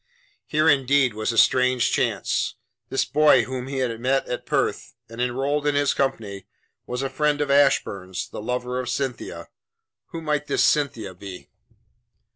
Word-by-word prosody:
Here 155 +1 +2
indeed 135 -3 +3
was 110 +2 -2
a 115 - -5
strange 125 +1 +4
chance! - - 0 0.3
This - - 0
boy 150 -5 +5
whom 130 +1 -5
he 135 0 -4
had 120 -3 -1
met 130 +3 +1
at 125 - -5
Perth, - - -1
and 115 +2 -7
enrolled 135 +4 0
in 145 - +2
his 145 -1 +2
company, 110 -8 -2 0.4
was 125 +2 -3
a - - 0
friend 150 +2 0
of 145 -1 0
Ashburn's 100 -10 +1
the - - -8
lover 125 +2 -2
of 125 -1 -4
Cynthia. 130 0 -4 0.6
Who 165 -2 -7
might 150 -1 -1
this - - +2
Cynthia 120 -10 +1
be? 95 0 -10
130 Hz, 160 wpm, -24 LUFS, 120-145 Hz, 0.6 s, boy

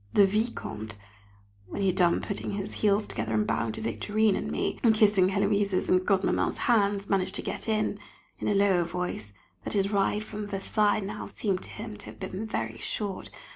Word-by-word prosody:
The 200 - +7
Vicomte 110 - -2 0.7
when 200 - -5
he - - +3
had 185 - 0
done 175 -3 +3
putting 200 - -4
his 200 +1 -4
heels 210 0 +3
together 110 0 -3
and 105 -1 +2
bowing 115 +1 0
to - - -6
Victorine 195 - +1
and - - -3
me, - - -1
and 225 -4 +5
kissing 205 -4 +5
Héloise's 200 -1 +1
and 185 0 +5
Godmamma's 195 -1 +1
hands 200 -4 +2
managed 190 -1 0
to - - +1
get - - -4
in, 215 -1 0 0.4
in - - -3
a 205 - +2
lower 195 -3 +4
voice, 170 -11 -4 0.3
that - - -5
his 200 0 +1
ride 205 +1 +1
from 210 -1 -6
Versailles 205 +2 +1
now 205 +2 -5
seemed 195 -4 -1
to - - -10
him 215 -1 -7
to 205 - -10
have - - -10
been 190 +2 -4
very 115 - -3
short. 200 - -3
200 Hz, 195 wpm, -28 LUFS, 180-210 Hz, 0.7 s, The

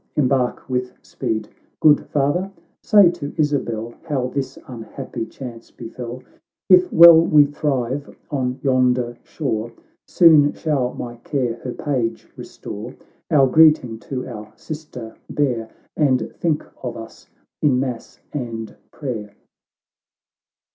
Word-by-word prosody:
— - - -47
Embark 130 -3 0
with 125 -1 -2
speed! 110 -1 -3 0.2
— - - -42
Good 150 -1 +5
Father, 150 +7 0 0.3
say 200 -5 +6
to 150 -5 -6
Isabel 120 -7 -1
How 130 -5 -2
this 135 0 -4
unhappy 115 -2 -7
chance 120 -3 -10
befell; 120 +2 -8 0.5
If 180 -1 +6
well 165 -1 +9
we 155 -3 +5
thrive 140 -2 -2 0.2
on 130 -3 -2
yonder 125 -2 +2
shore, 120 -7 -3 0.4
Soon 155 -4 +6
shall 135 -6 -1
my 120 -1 -6
care 125 -1 -2
her 125 +1 -6
page 125 -6 -2
restore. - - -8 0.3
Our 140 -3 +5
greeting 135 -5 +4
to 130 -2 -3
our 110 -3 -8
sister 150 -8 -8
bear, 120 -6 -1 0.3
And 140 -5 +1
think 160 -3 0 0.2
of 120 -1 -5
us 115 0 -11 0.3
in 135 -4 +3
mass 125 -3 -5
and 115 -5 -5 0.2
prayer." 110 -8 -6
130 Hz, 125 wpm, -21 LUFS, 120-150 Hz, 0.5 s, well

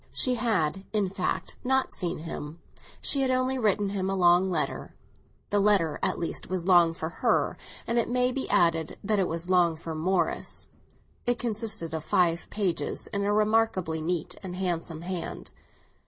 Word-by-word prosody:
She 255 - +1
had, 195 -7 0
in 200 -3 +1
fact, 185 -2 -2
not 265 +1 +1
seen 175 -2 -1
him, 155 0 -7 0.4
she 280 - +1
had 265 - +2
only 255 0 +1
written 205 -3 +2
him 195 -1 -2
a 195 - 0
long 180 0 +4
letter. 185 - -2 0.6
The 205 - +3
letter 195 -7 +3
at 190 -1 0
least 170 - -1
was 180 -2 -2
long 175 -3 +5
for 160 - -3
her; - - +1 0.3
and, 235 +1 +1
it 230 - 0
may 250 +1 +2
be 265 +1 -3
added, 165 -2 +2
that 210 0 +1
it 185 - +2
was 170 +2 -4
long 175 -3 +4
for 160 0 -6
Morris; 170 +2 -1 0.6
it 245 0 +2
consisted 215 -8 -2
of 160 -1 -3
five 170 +1 +1
pages, 195 -5 -1
in 200 0 0
a 205 - +1
remarkably 210 -6 +1
neat 170 +1 -2
and 185 -2 -6
handsome 170 -3 -3
hand. 180 -1 -5
185 Hz, 170 wpm, -27 LUFS, 170-215 Hz, 0.6 s, long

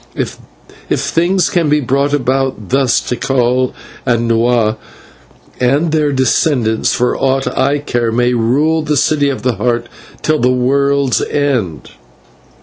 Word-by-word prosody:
If - - -4 0.6
things 180 +3 +1
can 170 -4 +1
be 150 +1 +3
brought 140 +1 0
about 135 -5 -1
thus, 130 -2 +2
Tikal 125 0 0 0.3
and 120 -2 0
Nahua 115 -1 +2 0.8
and 140 +6 +1
their 155 -2 +1
descendants, 130 -3 +1
for 125 +1 0
aught 135 0 0
I 140 +2 +1
care, 120 -5 -2
may 120 +2 +1
rule 140 +8 +1
in 155 - -4
the 150 -1 0
City 145 +1 +2
of 135 - -4
the 125 -5 0
Heart 120 +2 0 0.4
till 155 0 +1
the 125 - +2
world's 140 +1 +1
end." 125 - -2
130 Hz, 140 wpm, -14 LUFS, 120-145 Hz, 0.8 s, be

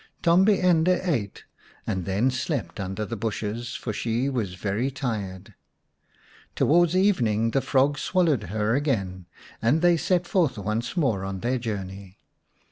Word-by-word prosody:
Tombi 190 +4 +4
ende 180 0 +3
ate 120 - -2 0.4
and 95 -2 -2
then 100 +7 +1
slept 125 - -3
under 95 +2 -3
the 115 - -5
bushes, 110 +2 -4
for 110 - -4
she 120 +5 -1
was 110 -9 -2
very 105 +7 -1
tired. 105 -8 -5 1.0
Towards 175 +2 +3
even 185 - +3
ing 110 +2 0
the 135 - +1
frog 140 +2 +2
swallowed 165 - +1
her 105 +4 -1
again, 100 - -1 0.3
and 145 +9 +2
they 175 -1 +5
set 180 +1 +1
forth 175 - +1
once 110 - -3
more 115 - +1
on 95 -1 -5
their 125 +1 0
journey. 100 -3 -6
120 Hz, 145 wpm, -25 LUFS, 100-155 Hz, 1.0 s, they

